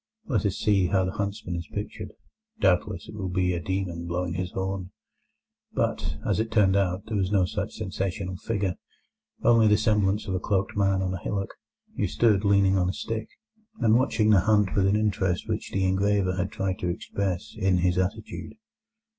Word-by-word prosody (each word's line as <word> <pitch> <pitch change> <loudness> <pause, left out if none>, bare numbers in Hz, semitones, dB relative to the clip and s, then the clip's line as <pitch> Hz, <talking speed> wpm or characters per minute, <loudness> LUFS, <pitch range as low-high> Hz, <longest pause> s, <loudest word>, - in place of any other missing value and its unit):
Let 115 -6 +1
us 100 - -2
see 100 -4 +3
how 95 +1 +2
the 95 - -2
huntsman 100 -3 -3
is 85 -2 -5
pictured: - - -6 0.5
doubtless 95 - +1
it - - -9
will 100 -3 -4
be 90 0 +1
a 85 - -1
demon 85 -1 -3
blowing 90 +1 -2
his 90 0 -2
horn."' 95 -1 -3 0.8
But, 75 0 -1
as 105 0 +1
it 110 0 0
turned 100 -4 +3
out, 95 -1 0
there 110 -1 -2
was 95 -1 0
no 95 -3 +4
such 105 +3 -4
sensational 95 -2 -3
figure, 100 -3 -2 0.7
only 115 -2 +5
the 105 0 +5
semblance 105 -2 +1
of 95 - -2
a 95 - 0
cloaked 95 0 -1
man 95 -1 +2
on 95 0 -1
a 95 - -4
hillock, 100 +1 -3 0.4
who - - +1
stood 105 -4 +3
leaning 100 -1 +4
on 90 0 +1
a - - -1
stick, 110 +1 -4 0.5
and 110 -3 +4
watching 115 -4 +3
the 100 - +6
hunt 105 0 +3
with 95 -1 +3
an 100 - +3
interest 100 -4 0
which - - -3
the 95 -1 0
engraver 95 0 +2
had 90 0 -2
tried 95 -1 -2
to 90 - -1
express 90 +1 -3
in 95 -4 +2
his 90 0 +2
attitude. 100 +4 -3
95 Hz, 190 wpm, -26 LUFS, 90-105 Hz, 0.8 s, the